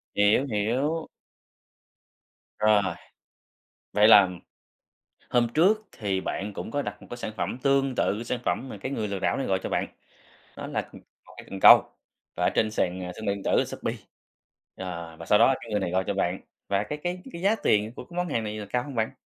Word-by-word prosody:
Hiểu, 105 +6 +4
hiểu. 130 +10 -1 1.5
Rồi, 105 -1 +4 1.1
vậy 105 +1 +5
là 100 -4 +8 1.0
hôm 120 -1 +3
trước 210 +7 +3
thì 95 -3 -2
bạn 100 +1 -4
cũng 110 - -6
có 145 - 0
đặt 105 -3 -6
một - - -13
cái 120 - -6
sản 110 - -5
phẩm - - -2
tương 135 -2 +2
tự 110 +4 0
sản 120 +1 -3
phẩm 135 - -1
mà - - -7
cái 130 - -4
người 110 -5 -2
lừa 100 -1 -3
đảo - - 0
này 135 - -2
gọi 95 -1 +1
cho - - -3
bạn, - - 0 0.7
đó - - -6
là, - - -3
ừm, - - -12 0.3
1 - - -16
cái - - -11
cần 95 -1 -6
câu - - +10 0.5
và - - 0
ở - - +3
trên 110 -1 +2
sàn, 90 -3 -1
à, 90 - -5
thương 110 - -7
mại 100 - +1
điện 100 - -9
tử - - +3
Shopee, - - -4 0.8
ờ, 85 -3 -6
và 80 - -9
sau 105 - +5
đó 130 +3 +5
cái 115 - -10
người 105 -1 0
này 90 - -2
gọi 95 +1 +1
cho 100 - -1
bạn, 95 -1 -1 0.3
và 100 0 +1
cái 150 +8 -5
cái 180 +1 -3
cái 170 - -7
giá 200 +3 +4
tiền 105 +1 +2
của - - -7
cái 175 - -13
món 180 0 -1
hàng 115 -7 -1
này 105 0 -4
là 105 - -6
cao 125 0 0
hông 140 -1 -8
bạn? 110 -1 -1
110 Hz, 220 wpm, -26 LUFS, 100-135 Hz, 1.5 s, câu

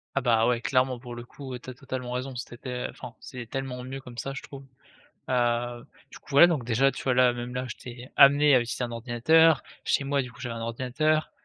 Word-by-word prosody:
Ah, - - +3
bah, 115 -3 +3
ouais 120 -1 +2
clairement 130 0 +1
pour 120 -1 -9
le 120 - -7
coup 130 +1 -8
tu 125 - -11
as - - -6
totalement 130 -1 -6
raison, 130 +1 -4
c'était 125 +1 -6
enfin - - -10
c'est 120 -3 -9
tellement 135 -1 -4
mieux 135 +1 -6
comme 125 -2 -12
ça 135 +4 -4
je 140 - -6
trouve, 140 -1 -11 0.6
heu, 120 -1 0 0.3
du - - -11
coup, 140 - -6
ouais 160 - +10
donc 160 -8 -1
déjà 125 +4 +3
tu - - -8
vois? 130 - +1
Là 125 -1 +4
même 120 +1 -6
là 125 0 -2
j'étais 125 +2 -9
amené 145 +1 +7
à 130 - +6
utiliser 120 +1 -3
un 120 - -5
ordinateur. 130 +6 +4 0.2
Chez 140 - +1
moi, 140 0 +1
du 125 -1 -9
coup 110 - -16
j'avais 120 -3 -4
un 115 - -5
ordinateur, 130 +7 0
125 Hz, 230 wpm, -27 LUFS, 120-135 Hz, 0.6 s, ouais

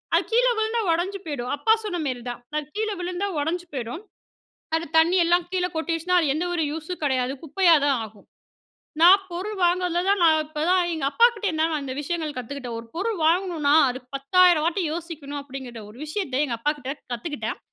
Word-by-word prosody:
அது - - +3
கீழ 485 +2 +4
விழுந்தா 440 +1 0
உடைஞ்சு 365 +4 -1
போயிடும். 255 -5 -4
அப்பா 445 - +4
சொன்ன 400 -5 -3
மாரிதான். 245 -2 -4
அது 305 -1 -1
கீழ 435 +1 -1
விழுந்தா 360 +2 -2
உடைஞ்சு 340 +4 -2
போயிடும். 255 - -5 0.7
அது 325 +1 -1
தண்ணி 330 +3 +5
எல்லாம் 345 +1 +2
கீழ 370 -1 0
கொட்டிடுச்சுன்னா 330 +2 0
அது 325 - +1
எந்த 320 +4 -1
ஒரு 335 -2 0
யூஸும் 320 +3 -6
கிடையாது. 260 -2 0
குப்பையா 335 +2 +4
தான் 280 -2 +2
ஆகும். 215 -2 -12 0.8
நான் 370 +4 +8
பொருள் 385 +5 -4
வாங்குறதுல 350 0 +1
தான் 400 -1 +2
நான், 315 -1 +5
இப்பதான், 325 +4 +1
எங்க 315 - -3
அப்பா 465 +10 +6
கிட்ட 425 -2 -4
இருந்து 315 -2 0
தான் 320 -1 0
அந்த 270 -2 -5
விஷயங்கள் 310 -1 -3
கத்துக்கிட்டேன். 250 -1 -6
ஒரு 230 - -14
பொருள் 415 +3 -1
வாங்கணும்னா, 330 -4 +2 0.2
அது 255 +1 -6 0.2
10,000 340 +3 +4
வாட்டி 350 +3 0
யோசிக்கணும் 315 -4 -6
அப்டிங்கிற 260 -4 -8
ஒரு 225 - -15
விஷயத்த 300 -5 -1
எங்க 240 -4 -3
அப்பா 295 +5 +1
கிட்ட 270 -1 -4 0.2
கத்துக்கிட்டேன். 295 +6 -4
325 Hz, 185 wpm, -24 LUFS, 280-360 Hz, 0.8 s, நான்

